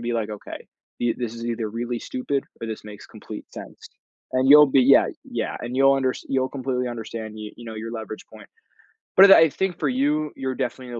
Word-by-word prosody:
be 120 0 -2
like, 110 -2 -2
"Okay. 105 -1 -8 0.4
Th 120 -1 0
this 120 -2 -4
is 115 - -7
either 115 -2 -2
really 120 +2 -4
stupid 135 +3 -3 0.2
or 115 - -5
this 110 -1 -6
makes 105 -1 -11
complete - - -10
sense." - - -11 0.4
And 130 +1 +2
you'll 150 +1 +9
be 135 - +5
yeah, 135 +2 +6 0.2
yeah, - - -4
and 120 +2 -6
you'll 135 0 +5
unders 130 -1 -1
you'll 130 -1 0
completely 130 -2 -3
understand, 115 -2 -6
you 105 -1 -7
you 120 - -12
know, 110 -1 -7
your 115 +1 -6
leverage 110 -2 -7
point. 105 -2 -13 0.7
But 195 +1 +9
I - - +10
I 160 - +6
think 190 +3 -2
for 150 - 0
you, 145 +4 0
you're 130 -1 -3
definitely 130 0 -4
in 120 - -9
125 Hz, 220 wpm, -23 LUFS, 115-135 Hz, 0.7 s, I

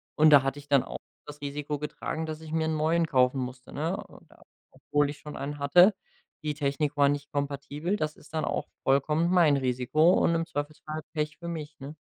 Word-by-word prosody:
Und 155 +1 +6
da 140 -2 +9
hatte 135 +1 -2
ich 145 - -15
dann 140 -3 +5
auch - - -7 0.3
das 145 0 -9
Risiko 145 +1 -3
getragen, 155 +1 -4
dass 155 0 -6
ich 155 -1 -9
mir 160 -1 +1
'n 160 - 0
neuen 165 +2 +2
kaufen 130 0 +3
musste, 125 0 -7
ne? 165 +6 -1
Und - - -18
da - - -20 0.3
obwohl 145 -1 0
ich 145 - -11
schon 150 - -9
einen 145 +1 -5
hatte, 175 +9 +6 0.5
die 150 -1 -2
Technik 145 0 -1
war 140 0 +5
nicht 145 0 -3
kompatibel, 145 +5 -2
das 155 -4 -2
ist 155 - -19
dann 155 - -1
auch - - -2 0.2
vollkommen 150 +5 +2
mein 170 -6 +5
Risiko 130 +6 +3
und 170 - +3
im 165 0 0
Zweifelsfall 155 0 -5
Pech 150 -1 -2
für 170 - -8
mich, 155 -3 -6
ne? 140 +3 -8
150 Hz, 215 wpm, -28 LUFS, 140-160 Hz, 0.5 s, da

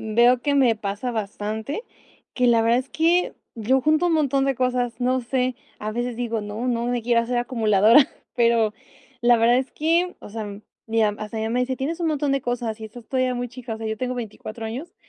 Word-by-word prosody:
veo 240 +2 +5
que 285 +1 +1
me 255 -5 +4
pasa 205 +3 -3
bastante, 220 - -4 0.5
que 250 - +2
la 235 -1 +5
verdad 230 +2 +3
es 260 +1 -4
que 340 +3 +2 0.2
yo 240 +4 +2
junto 310 +5 +3
un 345 - +2
montón 280 -4 +2
de 275 0 +1
cosas, 250 -2 -1
no 255 +1 +2
sé, 250 +1 0 0.2
a 215 - -4
veces 240 +1 -3
digo: 230 -2 -2
"No, 210 +4 -4
no 235 -1 0
me 245 -1 -1
quiero 235 0 +3
hacer 240 +1 -1
acumuladora", 230 +1 +4 0.3
pero, 230 -3 +3 0.5
la 240 0 +6
verdad, 235 +2 +4
es 265 0 -3
que, 335 +4 +1
o - - -10
sea, 215 0 -5 0.4
ya 225 -1 +2
hasta 215 +1 -5
mi 220 - -1
mamá 225 - -2
me 250 - +2
dice: 255 +1 -1
"Tienes 320 +6 -3
un 335 - +1
montón 290 -2 0
de 275 -1 0
cosas 240 -3 -2
y - - -6
estás 220 +1 -11
todavía 255 -1 +1
muy 245 0 -3
chica", 245 -1 -7
o - - -8
sea, 225 - -5
yo 220 0 -2
tengo 255 +2 -2
24 225 -1 -6
años, 270 +11 -6
245 Hz, 225 wpm, -23 LUFS, 225-260 Hz, 0.5 s, la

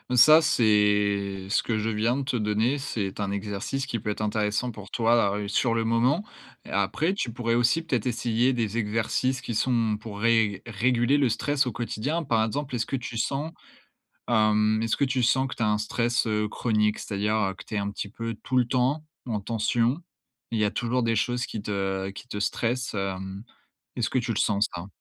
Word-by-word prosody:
Ça, 155 +6 +8
c'est 105 -5 +2
ce - - +2
que 115 - -1
je 110 +1 -1
viens 110 +3 +1
de 140 - -2
te 130 -2 -1
donner, 110 +5 +1
c'est 105 -9 -4
un 100 -1 -1
exercice 105 +6 -3
qui 120 -3 -3
peut 105 - -4
être 105 - -3
intéressant 105 +3 0
pour 105 -3 -11
toi 115 -3 +2
a - - -2
heu, 105 - -4
sur 115 +3 +2
le 115 -1 +1
moment 120 - +2 0.4
et - - -14
après, 100 - 0
tu 195 -11 -2
pourrais 115 -1 0
aussi 120 +7 +3
peut-être 130 -9 -1
essayer 120 +1 +1
des 115 -3 -1
exercices 115 +4 0
qui 120 - -4
sont 115 -2 +1
pour 105 -2 -8
ré 110 -4 +2
réguler 120 +4 +2
le 140 -2 +3
stress 135 +4 0
au 125 - -3
quotidien. 130 +8 -2
Par 115 -6 +1
exemple, 140 +4 -4
est-ce 115 -2 0
que - - -3
tu 120 -2 -5
sens, 140 +7 -1 0.8
hem, 110 -1 +3
est-ce 115 0 0
que 140 - +2
tu 130 -1 0
sens 130 +3 +3
que 130 - -5
tu - - -7
as 110 - +3
un 105 - +2
stress, 115 +3 0
heu, 105 -1 0
chronique? 105 -2 +1
C'est-à-dire, 105 +1 -1
heu, 95 -3 +1
que - - -11
tu - - -7
es - - +1
un 100 0 -1
petit 100 - -5
peu 115 +2 -4
tout 130 - 0
le 125 - +4
temps, 130 +5 0 0.2
en 110 -4 -2
tension. 115 - 0 0.5
Il 115 - -2
y 105 - +3
a 105 - 0
toujours 120 +2 0
des 115 0 +1
choses 120 +3 0
qui 110 - -6
te 95 -1 -2
qui 100 +5 -10
te 105 - -5
stressent, 120 +4 -1
hem, 95 +1 -4 0.5
est-ce - - 0
que - - -1
tu 120 -1 0
le 110 - -2
sens 105 0 +2
ça? 85 +2 -6
115 Hz, 215 wpm, -26 LUFS, 105-125 Hz, 0.8 s, Ça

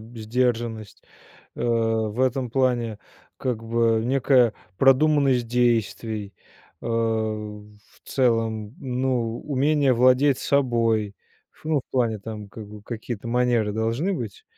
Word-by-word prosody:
б 115 +1 -12
сдержанность. 115 -2 -2 0.5
Э, - - -4
в 115 -1 0
этом 130 -1 0
плане, 120 -4 0 0.4
как 115 -3 -3
бы, 115 -1 +2
некая 125 -2 +3 0.2
продуманность 135 0 +4
действий, 115 -3 0 0.5
э, - - -6
в 110 -2 -2 0.3
целом, 115 -3 0
ну, 125 -3 -1
умение 145 -1 +2
владеть 130 +3 +4
собой. 115 -6 +1 0.4
Ф - - -25
ну, 155 -2 +1
в - - -26
плане 115 -4 0
там, 105 0 -8
как 110 0 -10
бы, 105 -1 -11
какие-то 115 0 -6
манеры 120 -3 +1
должны 115 - -1
быть, 115 - -6
115 Hz, 120 wpm, -24 LUFS, 110-130 Hz, 0.5 s, продуманность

